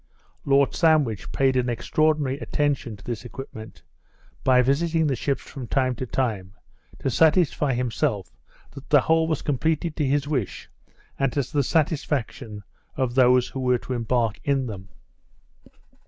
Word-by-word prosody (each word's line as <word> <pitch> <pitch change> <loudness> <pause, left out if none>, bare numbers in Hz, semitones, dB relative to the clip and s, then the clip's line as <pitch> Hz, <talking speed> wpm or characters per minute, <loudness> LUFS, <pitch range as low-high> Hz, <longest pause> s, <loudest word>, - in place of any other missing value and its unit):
Lord 140 0 +3
Sandwich 150 - +2
paid 135 -1 +2
an 125 -1 +1
extraordinary 145 +2 0
attention 140 -9 -1
to 100 - -16
this 120 -1 -5
equipment, 120 -3 -10 0.6
by 125 -1 +5
visiting 160 +5 +1
the 140 -3 +1
ships 135 +3 -2
from 130 -4 -8
time 130 +1 +1
to 130 - -4
time, 105 -7 -2 0.4
to 135 - -2
satisfy 155 -2 +3
himself 120 - -2 0.4
that 140 0 -12
the 145 -3 +6
whole 160 +2 +2
was 160 -3 -2
completed 155 +3 -1
to 150 - 0
his 145 +1 +1
wish, 130 - -3 0.5
and 135 -2 +1
to 140 - +1
the 145 +3 -1
satisfaction 140 -8 -1 0.3
of 130 -3 0
those 125 -1 +4
who 135 - -6
were 125 -1 +2
to 130 - -6
embark 115 -2 0
in 140 -2 +1
them. 95 -5 -8
135 Hz, 150 wpm, -24 LUFS, 120-145 Hz, 0.6 s, the